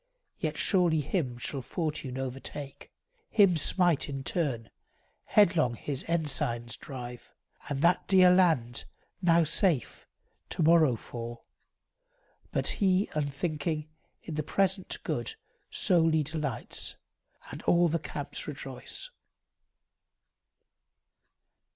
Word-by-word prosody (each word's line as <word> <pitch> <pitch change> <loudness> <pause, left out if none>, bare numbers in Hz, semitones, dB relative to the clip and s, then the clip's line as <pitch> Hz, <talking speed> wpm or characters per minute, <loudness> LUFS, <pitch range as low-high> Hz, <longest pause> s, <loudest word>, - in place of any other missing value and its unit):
Yet - - -2
surely 175 -5 +3
him 140 -5 -1
shall 135 +3 -3
fortune 150 -3 -3
overtake, 135 +2 -6 0.4
Him 200 -5 +5
smite 175 0 +2
in 135 -1 -4
turn, 135 -9 -1 0.5
headlong 170 - +4
his 135 +3 -4
ensigns 135 -8 0
drive; 125 -3 -8 0.4
And 140 -1 -2
that 175 +1 +3
dear 185 -2 +7
land, 160 -11 +2 0.4
now 170 -2 +5
safe, 165 - 0 0.4
to - - -1
morrow 160 -5 +5
fall. 120 +1 -8 1.1
But - - -1
he, 190 0 +3
unthinking, 150 +1 -2 0.3
in 165 - -6
the 155 - -1
present 190 +4 0
good 445 - -2 0.3
Solely 165 -4 +3
delights, 150 -5 -3 0.6
and - - -7
all 175 0 +5
the 165 +1 0
camps - - -5
rejoice. - - -5
155 Hz, 100 wpm, -29 LUFS, 135-175 Hz, 1.1 s, dear